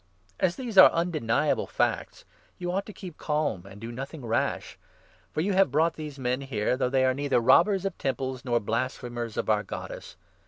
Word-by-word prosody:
As 180 Hz, -1 st, +2 dB
these 235 Hz, -7 st, +1 dB
are -, -, +11 dB
undeniable 165 Hz, -9 st, 0 dB
facts, -, -, -1 dB, 0.3 s
you 175 Hz, 0 st, -3 dB
ought 195 Hz, +2 st, -2 dB
to -, -, -7 dB
keep 185 Hz, -4 st, -9 dB
36 -, -, -16 dB
calm 150 Hz, -, 0 dB
and 100 Hz, +1 st, -12 dB
do 115 Hz, +2 st, -6 dB
nothing 135 Hz, +3 st, -7 dB
rash; 115 Hz, -, -1 dB, 0.5 s
for 155 Hz, -, -1 dB
you 195 Hz, +4 st, 0 dB
have 190 Hz, -4 st, +4 dB
brought 160 Hz, +5 st, +2 dB
these 150 Hz, -3 st, -7 dB
men 125 Hz, -1 st, -1 dB
37 135 Hz, -1 st, -9 dB
here, 105 Hz, +4 st, +1 dB
though 125 Hz, -1 st, 0 dB
they 130 Hz, 0 st, +2 dB
are 130 Hz, -, +3 dB
neither 140 Hz, -1 st, +1 dB
robbers 190 Hz, -, +4 dB
of 195 Hz, -, -2 dB
Temples 130 Hz, -1 st, -2 dB
nor 120 Hz, -3 st, +1 dB
blasphe 115 Hz, +5 st, -2 dB
mers 120 Hz, -2 st, -5 dB
of -, -, -1 dB
our 105 Hz, -1 st, +3 dB
Goddess. 105 Hz, -, -8 dB
135 Hz, 205 wpm, -27 LUFS, 120-170 Hz, 0.5 s, are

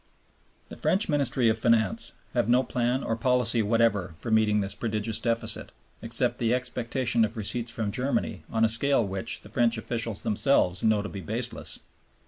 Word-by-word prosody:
The -, -, -9 dB
French 200 Hz, +4 st, +2 dB
Ministry 135 Hz, -5 st, +1 dB
of 110 Hz, 0 st, +2 dB
Finance 115 Hz, -, +1 dB, 0.2 s
have 120 Hz, -2 st, +1 dB
no 125 Hz, +2 st, +4 dB
plan 125 Hz, +1 st, -1 dB
or 115 Hz, -, -1 dB
policy 120 Hz, -1 st, +2 dB
whatever 105 Hz, -5 st, +1 dB
for 115 Hz, -, -5 dB
meeting 110 Hz, -1 st, +3 dB
this 100 Hz, -1 st, -2 dB
prodigious 110 Hz, -1 st, -2 dB
deficit, 115 Hz, 0 st, -1 dB, 0.3 s
except -, -, -1 dB
the 115 Hz, +1 st, +2 dB
expectation 120 Hz, -1 st, 0 dB
of 110 Hz, +2 st, -2 dB
receipts 115 Hz, +3 st, -2 dB
from 110 Hz, -3 st, -2 dB
Germany 130 Hz, +5 st, -1 dB
on 115 Hz, 0 st, +2 dB
a -, -, +4 dB
scale 120 Hz, +2 st, +2 dB
which 95 Hz, -1 st, -3 dB
the 105 Hz, -, -13 dB
French 120 Hz, 0 st, +2 dB
officials 115 Hz, -2 st, -2 dB
themselves 105 Hz, -5 st, +1 dB
know 110 Hz, -2 st, +3 dB
to 105 Hz, -, -5 dB
be 100 Hz, -, -7 dB
baseless. 80 Hz, -, -4 dB
115 Hz, 170 wpm, -27 LUFS, 110-125 Hz, 0.3 s, no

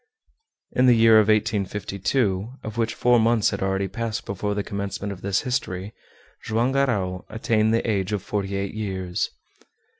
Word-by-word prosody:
In 130 Hz, +1 st, +3 dB
the 125 Hz, -, +7 dB
year 115 Hz, -1 st, +6 dB
1852 105 Hz, 0 st, +1 dB
of 110 Hz, -1 st, -6 dB
which 115 Hz, -1 st, -1 dB
four 125 Hz, -1 st, +4 dB
months 115 Hz, -1 st, +3 dB
had 100 Hz, -, -4 dB
already 95 Hz, 0 st, 0 dB
passed 115 Hz, +2 st, -4 dB
before 100 Hz, +1 st, -2 dB
the 105 Hz, -, -1 dB
commencement 100 Hz, 0 st, -4 dB
of 95 Hz, -, -12 dB
this 100 Hz, -1 st, 0 dB
history 110 Hz, -7 st, -3 dB, 0.5 s
Joam 115 Hz, +4 st, +1 dB
Garral 100 Hz, -10 st, 0 dB
attained 110 Hz, 0 st, +1 dB
the 115 Hz, +1 st, +1 dB
age 100 Hz, -3 st, 0 dB
of 105 Hz, -2 st, -2 dB
forty 100 Hz, -1 st, -2 dB
eight 100 Hz, -1 st, -3 dB
years. 95 Hz, -4 st, -2 dB
105 Hz, 155 wpm, -24 LUFS, 100-115 Hz, 0.5 s, the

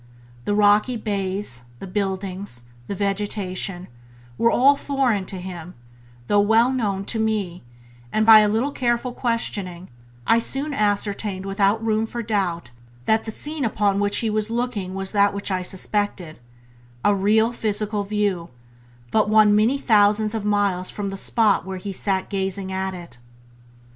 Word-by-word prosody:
The 205 Hz, -, 0 dB
rocky 210 Hz, +4 st, +4 dB
bays, 195 Hz, -, -3 dB
the -, -, -8 dB
buildings, 190 Hz, -, -4 dB, 0.2 s
the 200 Hz, -, -4 dB
vegetation, 195 Hz, -2 st, -2 dB, 0.5 s
were 230 Hz, -, +3 dB
all 275 Hz, +4 st, +5 dB
foreign 265 Hz, -9 st, 0 dB
to 190 Hz, -, -6 dB
him, 180 Hz, -1 st, -8 dB, 0.5 s
though 205 Hz, +10 st, +3 dB
well 225 Hz, +4 st, +4 dB
known 200 Hz, -6 st, -1 dB
to 225 Hz, -, -2 dB
me; 210 Hz, -5 st, -1 dB, 0.5 s
and 215 Hz, 0 st, +1 dB
by 220 Hz, -1 st, +10 dB
a 210 Hz, -1 st, +3 dB
little 230 Hz, +7 st, 0 dB
careful 245 Hz, -1 st, -1 dB
questioning 200 Hz, -7 st, -2 dB, 0.4 s
I 230 Hz, -, +4 dB
soon 275 Hz, +5 st, -1 dB
ascertained 205 Hz, -3 st, -1 dB
without 200 Hz, +3 st, +1 dB
room 220 Hz, 0 st, +1 dB
for 235 Hz, +1 st, -5 dB
doubt 185 Hz, -, -2 dB, 0.3 s
that 220 Hz, 0 st, +2 dB
the 220 Hz, -, -4 dB
scene 300 Hz, +5 st, -4 dB
upon 205 Hz, -3 st, +1 dB
which 205 Hz, 0 st, +2 dB
he -, -, +1 dB
was 215 Hz, 0 st, -1 dB
looking 230 Hz, -6 st, -3 dB
was 195 Hz, 0 st, -3 dB
that 200 Hz, -1 st, +3 dB
which 200 Hz, 0 st, -3 dB
I 185 Hz, -1 st, 0 dB
suspected 190 Hz, -2 st, -3 dB, 0.3 s
— -, -, -28 dB, 0.3 s
a 205 Hz, -, +5 dB
real 215 Hz, +4 st, +2 dB
physical 210 Hz, -2 st, -1 dB
view, 200 Hz, -4 st, -1 dB, 0.6 s
but 215 Hz, -1 st, +2 dB
one 215 Hz, -1 st, +5 dB
many 225 Hz, +6 st, +3 dB
thousands 215 Hz, -3 st, +3 dB
of 220 Hz, -2 st, -3 dB
miles 200 Hz, -3 st, +1 dB
from 200 Hz, -1 st, -4 dB
the -, -, -5 dB
spot 210 Hz, +1 st, +2 dB
where 190 Hz, 0 st, -6 dB
he 195 Hz, +1 st, -6 dB
sat 190 Hz, 0 st, -1 dB
gazing 190 Hz, -1 st, -3 dB
at 190 Hz, 0 st, -2 dB
it. 170 Hz, -9 st, -9 dB
205 Hz, 160 wpm, -22 LUFS, 190-220 Hz, 0.6 s, by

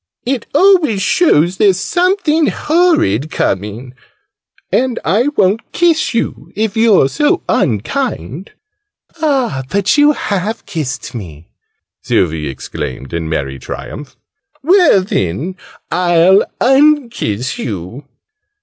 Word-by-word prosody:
"It 250 Hz, -2 st, -2 dB
always 335 Hz, -, +4 dB
show's 190 Hz, -, +2 dB
there's 195 Hz, -3 st, +3 dB
something 350 Hz, -, +1 dB
horrid 300 Hz, -, +1 dB
coming! 105 Hz, +3 st, -3 dB, 0.8 s
And 255 Hz, -1 st, 0 dB
I 230 Hz, +8 st, +2 dB
won't 200 Hz, +3 st, +1 dB
kiss 335 Hz, -2 st, +2 dB
you, 150 Hz, -, -3 dB
if 215 Hz, 0 st, -1 dB
you're 220 Hz, -10 st, +4 dB
so 295 Hz, -, 0 dB
unkind." 115 Hz, -, -2 dB, 0.7 s
"Ah, 265 Hz, -, 0 dB
but 200 Hz, +8 st, +1 dB
you 295 Hz, +1 st, +5 dB
have 205 Hz, -1 st, -3 dB
kissed 135 Hz, -6 st, -5 dB
me!" 85 Hz, -9 st, -9 dB, 0.5 s
Sylvie 80 Hz, -3 st, 0 dB
exclaimed 65 Hz, +1 st, -7 dB
in 80 Hz, -1 st, -3 dB
merry 70 Hz, -4 st, -3 dB
triumph. 130 Hz, -, -8 dB, 0.5 s
"Well 340 Hz, -, +4 dB
then, 150 Hz, -, -2 dB, 0.4 s
I'll 180 Hz, +2 st, +3 dB
unkiss 255 Hz, -, +1 dB
you!" 110 Hz, -, -6 dB
190 Hz, 105 wpm, -15 LUFS, -, 0.8 s, you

